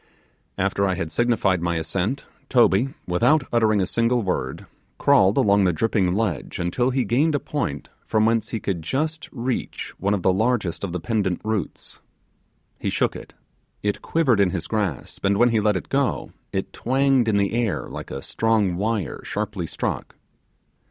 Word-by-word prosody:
After 100 +1 +1
I 95 - 0
had 80 -2 -4
signified 110 -7 +2
my 85 0 0
assent, 90 - -2 0.2
Toby, 120 +1 +3
without 125 - +3
uttering 110 -3 +3
a - - +2
a - - +1
single 115 +3 +1
word, 95 - -2 0.3
crawled 95 +2 +4
along 100 -1 +4
the 90 - +4
dripping 95 0 +1
ledge 105 -8 -2
until 90 +9 0
he 130 -1 0
gained 150 +6 +2
a - - +1
point 75 - -4 0.2
from 110 0 +2
whence 115 0 +1
he 115 - -3
could 95 -5 -2
just 155 - -2
reach 125 0 -3
one 100 +1 +1
of 95 - -4
the 95 - +4
largest 105 -4 0
of 95 - -2
the 90 - -3
pendant 100 -2 -1
roots; 110 -6 -4 0.8
he - - -1
shook - - 0
it - - -10 0.5
it 105 0 -1
quivered 135 -10 +2
in 100 -2 +4
his 90 -2 -3
grasp, 95 - -3
and 100 0 +2
when 120 +2 +5
he 115 -2 +2
let 105 -2 +2
it - - -7
go 135 -1 0 0.2
it 95 - -3
twanged 135 -1 +2
in 105 -2 +3
the 100 +1 +1
air 115 -3 0
like - - -7
a - - -6
strong, 110 -5 +1
wire 105 -4 -2
sharply - - -3
struck. - - -4
105 Hz, 180 wpm, -23 LUFS, 95-120 Hz, 0.8 s, when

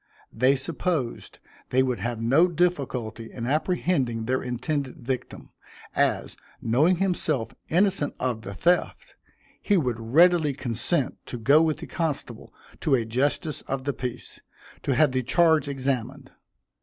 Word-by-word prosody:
They 130 +4 +3
supposed 150 -2 -2 0.3
they 130 +1 +3
would 125 -2 -1
have 120 -1 -3
no 135 +10 +4
difficulty 135 -10 -1
in 115 - -5
apprehending 140 -5 0
their 130 +2 0
intended 130 +2 -3
victim, 130 +1 -5 0.4
as, - - +1 0.2
knowing 145 +11 +3
himself 170 -9 0 0.2
innocent 185 -3 +2
of 125 -3 -1
the 100 -2 -8
theft, 175 - 0 0.5
he 205 - +2
would 125 -8 0
readily 155 +6 +4
consent 130 +4 -1
to 125 - -5
go 140 +7 +5
with 160 -2 +1
the - - -8
constable 145 -8 -4 0.3
to 150 -5 +2
a 120 -3 0
justice 140 +6 -1
of 135 0 -2
the 140 +1 -1
peace, 125 -1 -5 0.4
to 135 - 0
have 150 +1 +4
the 130 0 0
charge 160 +4 +3
examined. 135 -1 -3
135 Hz, 140 wpm, -25 LUFS, 120-160 Hz, 0.5 s, go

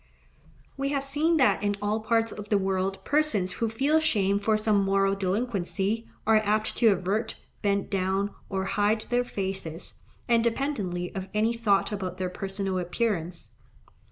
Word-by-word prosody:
We 275 0 -1
have 280 -1 -1
seen 305 +4 +2
that 230 -10 +3
in 205 0 0
all 205 +2 0
parts 225 0 +1
of 210 0 -8
the 210 - +4
world 190 0 -1
persons 285 -12 +2
who 230 +4 -1
feel 275 +8 +2
shame 200 -10 +2
for 215 +1 +2
some 215 -2 +2
moral 195 0 +2
delinquency, 200 +1 -1 0.2
are 220 0 +5
apt 215 0 +1
to 235 - +4
avert, 200 +3 +1 0.3
bend 200 0 0
down, 195 +1 0 0.2
or 190 -1 -2
hide 210 +2 +1
their 245 0 +3
faces, 190 -7 -4 0.3
independently 230 -6 0
of 190 0 -5
any 220 +2 +2
thought 220 -4 +1
about 185 -3 -4
their 185 -1 -2
personal 195 0 -2
appearance. 180 -2 -2
205 Hz, 155 wpm, -27 LUFS, 190-230 Hz, 0.3 s, are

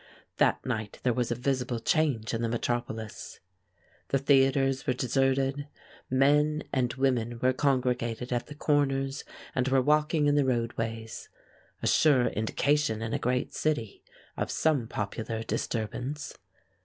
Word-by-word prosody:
That - - +2
night 110 -5 -3
there 125 - +2
was 125 0 -1
a 120 - 0
visible 125 -1 -1
change 135 -5 +1
in 115 - -1
the 115 - 0
metropolis. 115 -2 -4 0.7
The 135 - +1
theaters 135 -1 +3
were 125 - +3
deserted, 135 +3 0 0.4
men 150 +3 +3
and 125 -3 +1
women 120 -3 0
were 130 +1 +2
congregated 125 -3 0
at 120 - -2
the 145 - -9
corners 135 -2 0 0.3
and 130 0 0
were 135 0 +3
walking 150 +3 +2
in 145 - +3
the 145 -1 +3
roadways 115 -3 -3 0.5
a - - +1
sure 140 -6 +4
indication 115 +2 0
in 115 - -3
a - - 0
great 125 +1 -1
city 145 -9 -2 0.4
of - - -2
some 145 -7 +1
popular 110 +2 -4
disturbance. 125 +6 -3
130 Hz, 140 wpm, -28 LUFS, 115-140 Hz, 0.7 s, sure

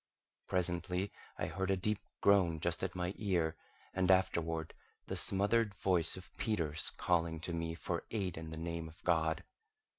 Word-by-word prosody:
Presently 90 +1 0 0.3
I - - -1
heard 95 0 -2
a 95 - +3
deep 105 +3 0 0.2
groan 95 -5 +4
just 85 +2 -1
at 95 -1 -2
my 90 +1 -1
ear, 85 -6 +1 0.4
and 95 -1 +1
afterward 85 -4 +2 0.3
the - - -3
smothered 100 +1 +4
voice 90 -3 +1
of 95 - -12
Peters 80 -8 0
calling 85 -2 +1
to 85 - -3
me 85 0 -2
for 85 0 -3
aid 95 -6 -2
in 80 0 -6
the 80 - -6
name 85 0 -3
of 80 +1 -14
God. 80 -2 +2
90 Hz, 160 wpm, -35 LUFS, 80-95 Hz, 0.4 s, groan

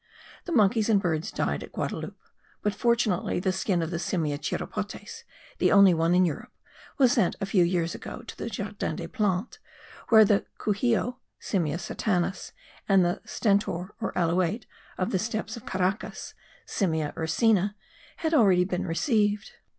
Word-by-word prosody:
The 350 - -5
monkeys 220 -4 +3
and 210 -3 +5
birds 165 -4 -1
died - - -1
at - - -9
Guadaloupe - - -4 0.5
but 210 - +1
fortunately 235 -8 +1
the 185 +1 0
skin 185 -2 0
of 165 - -4
the 170 - -2
Simia 155 -6 -1
chiropotes, - - -5 0.4
the - - +3
only 200 -2 +7
one 165 +1 +2
in 185 0 +5
Europe, 220 +9 -4 0.5
was 260 -3 +5
sent 180 - +2
a - - -1
few 190 -2 +3
years 170 -1 0
ago - - -8
to - - -9
the - - -5
Jardin - - -4
des - - -5
Plantes, 210 - -1 0.5
where 220 -1 +8
the 200 0 +2
couxio 235 +3 0 0.2
(Simia 165 -6 -1
satanas) 185 -1 -2 0.4
and 195 -2 +5
the 175 - -1
stentor 200 -3 0
or 225 - -1
alouate 180 +5 +1 0.3
of 185 - -1
the 190 - +1
steppes 220 +2 -3
of 235 - -11
Caracas 190 +2 -2 0.3
(Simia 160 -6 -1
ursina) 200 +5 +2 0.4
had 320 -1 -1
been 310 - +5
already 185 -5 +5
received. 210 - 0
195 Hz, 160 wpm, -27 LUFS, 175-220 Hz, 0.5 s, where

